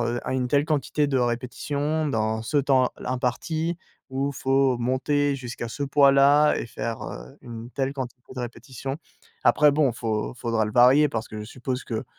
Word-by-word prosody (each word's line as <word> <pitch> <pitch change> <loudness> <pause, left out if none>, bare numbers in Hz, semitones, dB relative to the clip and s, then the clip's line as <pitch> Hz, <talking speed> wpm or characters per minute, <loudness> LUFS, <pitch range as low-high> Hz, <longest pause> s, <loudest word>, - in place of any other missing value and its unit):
heu, 120 +1 -1
un - - -1
une 125 -1 -1
telle 145 +2 +3
quantité 150 -1 0
de 135 - 0
répétitions 140 +5 -1
dans 110 -3 -1
ce 130 +6 0
temps 130 -2 +3
l - - -8
imparti. 155 +7 -1 0.3
Ou 135 +2 -1
faut 135 -1 +2
monter 140 +4 +1
jusqu'à 120 -3 -6
ce 115 +5 -5
poids-là 140 +1 +5
et - - -4
faire, 115 0 -5
heu, - - -9
une 115 0 -9
telle 135 +1 -2
quantité 130 -2 -6 0.2
de - - -3
répétitions». 125 +3 -6 0.5
Après 150 0 +5
bon, 140 -3 +2
faut 110 0 -3
faudra 115 -3 -1
le 105 - -5
varier 130 +6 +6
parce 110 -4 -3
que 110 - -7
je - - -6
suppose 125 +3 -5
que 115 +1 -4
130 Hz, 180 wpm, -25 LUFS, 120-140 Hz, 0.5 s, varier